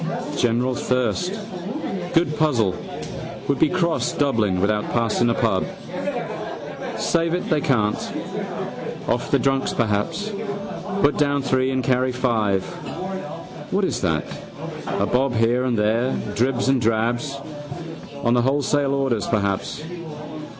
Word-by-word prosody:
General 125 0 +2
thirst. 125 - +1 0.8
Good 165 -2 +3
puzzle 120 -11 +3 0.7
would 140 -1 +1
be 160 - +5
cross 170 -2 +1
Dublin 110 -10 +2
without 105 +2 +2
passing 120 0 +3
a - - +3
pub. 105 -5 +2 1.3
Save 165 0 +2
it 180 - -2
they 155 -2 +3
can't. 110 -8 +2 1.1
Off - - 0
the - - +5
drunks 135 -1 +2
perhaps. 115 - 0 0.7
Put 145 - +4
down 145 -1 +3
three 130 0 +2
and 130 -1 0
carry 130 +1 +2
five. 110 -6 +1 1.1
What 195 +1 +3
is 125 -8 -1
that, 80 -5 +1 0.6
a - - +1
bob 125 0 +2
here 120 +3 +3
and 125 -3 +1
there, 115 +5 +2 0.2
dribs 125 +2 +2
and 135 -2 +4
drabs. 120 +5 +1 0.9
On 120 - +4
the 120 - +4
wholesale 140 +1 +2
orders 135 -6 +1
perhaps. 100 +6 0
125 Hz, 120 wpm, -23 LUFS, 110-140 Hz, 1.3 s, be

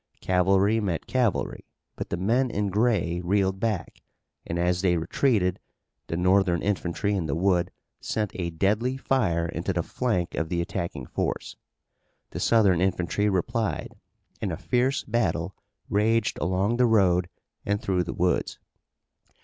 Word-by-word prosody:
Cavalry 95 +4 +3
met 95 -6 -2
cavalry 125 -7 0 0.3
but - - -5
the 85 - -2
men 120 +8 +1
in 105 -3 -1
gray 105 -5 +1
reeled 95 +1 +1
back, 105 -5 -2 0.5
and 85 - -2
as 90 +1 +1
they 90 -2 +2
retreated 90 +1 +1 0.5
the 85 - -3
Northern 90 -1 +3
infantry 100 0 -1
in 90 -5 -1
the 70 - -1
wood 90 0 +2 0.3
sent 105 -2 -2
a 85 -2 -3
deadly 105 +10 0
fire 95 -12 +1
into 85 +3 -3
the 85 -1 0
flank 100 -8 -1
of 80 -1 -2
the 85 -1 -1
attacking 85 -6 -3
force. - - -3 0.8
The - - -5
Southern 100 -7 +4
infantry 95 +2 +1
replied, 110 +4 -1 0.5
and - - -1
a - - -3
fierce 130 +3 0
battle 95 -6 -1 0.3
raged 110 +2 +1
along 95 +6 0
the 125 0 +4
road 90 -5 +3 0.3
and 100 0 0
through 90 -3 0
the 85 - -5
woods. 90 -3 0
95 Hz, 145 wpm, -26 LUFS, 85-110 Hz, 0.8 s, Southern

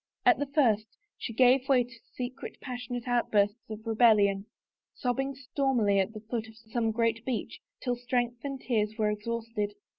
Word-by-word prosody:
At - - +6
the 285 - -1
first 230 -7 +3 0.3
she - - -5
gave 255 +3 +4
way 255 -2 +5
to 235 -1 -14 0.2
secret, 255 +2 -6
passionate 245 -1 -5
outbursts 220 -3 +1
of 215 +1 -7
rebellion, 210 -3 +4 0.5
sobbing 270 +2 -1
stormily 255 -6 +1
at 195 +2 +1
the 215 - -8
foot 225 0 -4
of 220 - -14
some 225 0 -1
great 230 0 +1
beech 250 -2 -3 0.2
till 245 -2 0
strength 245 -1 -1
and 275 -2 -4
tears 215 -4 0
were 215 -1 +2
exhausted. 215 -1 -3
235 Hz, 160 wpm, -29 LUFS, 215-250 Hz, 0.5 s, At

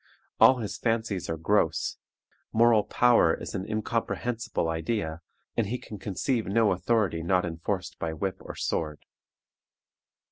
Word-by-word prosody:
All 130 - +7
his 110 -4 -5
fancies 115 -5 -1
are 80 - -1
gross; 80 - +1 0.5
moral 115 -1 +5
power 120 -10 +4
is - - -7
an 95 +1 -4
incomprehensible 115 -1 -2
idea, 80 0 -2 0.3
and 115 -3 +1
he 120 +5 -2
can 105 -4 -10
conceive 110 +5 -1
no 110 +1 +3
authority 95 -3 +1
not 90 +2 +2
enforced 85 +3 -4
by 80 - -2
whip 95 +4 -3
or - - -9
sword. 75 -2 -3
100 Hz, 135 wpm, -28 LUFS, 85-115 Hz, 0.5 s, All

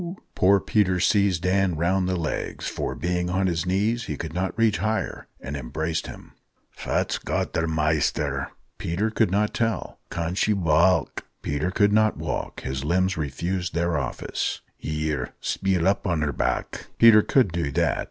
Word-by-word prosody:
Poor 100 +2 +4
Peter 95 -3 +1
seized 95 -2 +2
Dan 95 -1 +2
round 90 +3 +1
the 95 - 0
legs, 80 -4 -3
for, - - -3
being 90 +1 -1
on 95 +2 +1
his 85 -2 -1
knees, 105 +6 +1
he - - -4
could 80 -1 -5
not 95 +4 -2
reach 115 -2 +3
higher, 110 +1 -2
and 70 +2 -6
embraced 80 +5 -3
him. - - -11 0.4
"Fat's - - -1
got - - -2
the 80 0 0
maister?" 80 -2 0 0.3
Peter 100 +7 -1
could 110 -2 +2
not 105 +3 +1
tell. 115 -5 -2
"Can 85 +1 -2
she 105 +3 +2
waalk?" 85 0 +2 0.2
Peter 75 +4 -1
couldn't 105 +3 +3
walk 75 -4 -4
his 65 0 -4
limbs 95 +5 +1
refused 85 +5 -3
their 85 0 +1
office. 70 -4 -2
"Here, 75 -4 -3
speel 95 -3 0
up 100 +1 +1
on 85 -4 +1
her 75 -1 -1
back." - - -2
Peter 115 -2 +8
could 125 -4 +2
do 85 -4 -2
that. - - +1
90 Hz, 160 wpm, -25 LUFS, 80-100 Hz, 0.4 s, Peter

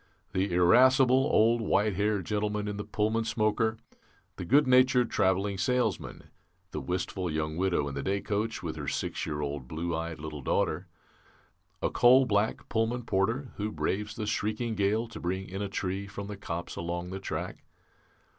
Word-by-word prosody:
"The 95 +1 0
irascible 130 +9 +5
old 115 +2 +4
white 105 -1 +2
haired 105 0 0
gentleman 105 0 -1
in 105 0 -3
the 105 - -3
Pullman 110 +2 0
smoker; 110 0 +1 0.6
the 90 - -5
good 145 - +5
natured 125 -1 +4
travelling 95 +1 +1
salesman; 120 -1 -1 0.5
the 75 - -4
wistful 90 +4 -2
young 75 0 -2
widow 90 -5 +1
in 70 - -5
the 70 - -3
day 100 +6 0
coach, 105 -1 -2
with 80 -2 -4
her 75 -2 -5
six - - -2
year 75 -1 -3
old 70 -3 -4
blue 85 +3 -3
eyed 80 0 -4
little 75 -1 -6
daughter. 80 +6 0 1.0
A - - +1
coal 130 +2 +6
black 105 -1 0
Pullman 115 +2 0
porter 115 +7 0
who 105 +1 -2
braves 105 +1 -2
the 110 - -3
shrieking 110 +2 -1
gale 105 +3 +1
to - - -9
bring 95 +2 -3
in 95 +2 -5
a 100 - -2
tree 95 +1 -3
from 100 0 -7
the 105 0 -6
copse 85 -4 -5
along 85 +1 -4
the 95 - -4
track. 95 - -5
100 Hz, 175 wpm, -29 LUFS, 90-110 Hz, 1.0 s, coal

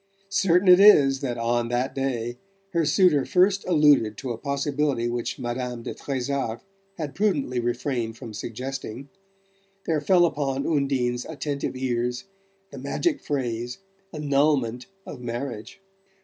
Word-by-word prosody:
Certain 195 -1 +2
it 180 0 +8
is 140 -10 +7
that 125 -4 -3
on 120 0 0
that 120 +2 -1
day 125 -3 -3 0.3
her 165 -3 +1
suitor 155 -3 +4
first 195 +1 +3
alluded 145 - +4
to 130 - -4
a 115 - -4
possibility 140 -2 -1
which 120 0 -3
Madame 120 0 -4
de - - -5
Trezac 135 -3 -3 0.4
had 150 -4 -4
prudently 150 -11 0
refrained 120 -1 -2
from 115 -2 -9
suggesting, 130 +3 -6 0.8
there 155 -2 0
fell 175 +2 +4
upon 140 -4 -1
Undine's 135 -5 0
attentive 145 -3 -4
ears 125 -1 -2 0.5
the 140 - -8
magic 285 - -1
phrase 120 -4 -3 0.3
"annulment 140 -5 +1 0.2
of - - -9
marriage." 120 - -5
135 Hz, 130 wpm, -25 LUFS, 120-150 Hz, 0.8 s, it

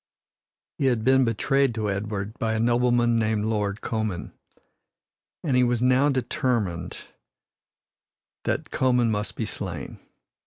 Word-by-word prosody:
He 135 - +2
had 120 -4 +1
been 130 +1 +4
betrayed 135 +3 +1
to 105 -2 -1
Edward 100 +1 -3
by 110 -1 0
a - - -1
nobleman 120 0 +3
called 110 0 +1
Lord 105 -2 -1
Comyn, 110 -8 -3 1.1
and 140 -6 +1
he 125 - +5
now 125 +3 +3
determined 120 - -1 1.5
that - - -2
Comyn 125 -3 +2
must 105 0 -2
be 115 - -2
slain. 90 -8 -6
115 Hz, 120 wpm, -25 LUFS, 105-125 Hz, 1.5 s, he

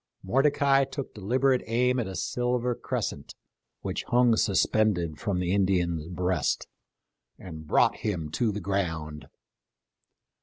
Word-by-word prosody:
Mordecai 135 +5 +3
took 135 0 -6
deliberate 125 +6 +1
aim 125 +3 +2
at 120 - -2
a 95 - -6
silver 125 +2 -1
crescent - - -4 0.5
which - - -3
hung 120 -1 +4
suspended 95 -6 +1
from 100 -3 -1
the 90 0 0
Indian's 90 -5 +1
breast, 90 +1 -1 0.7
and 80 -4 -10
brought - - +3
him 85 -8 -3
to 110 +6 0
the 105 - -4
ground. 80 -6 -3
100 Hz, 120 wpm, -27 LUFS, 90-125 Hz, 0.7 s, hung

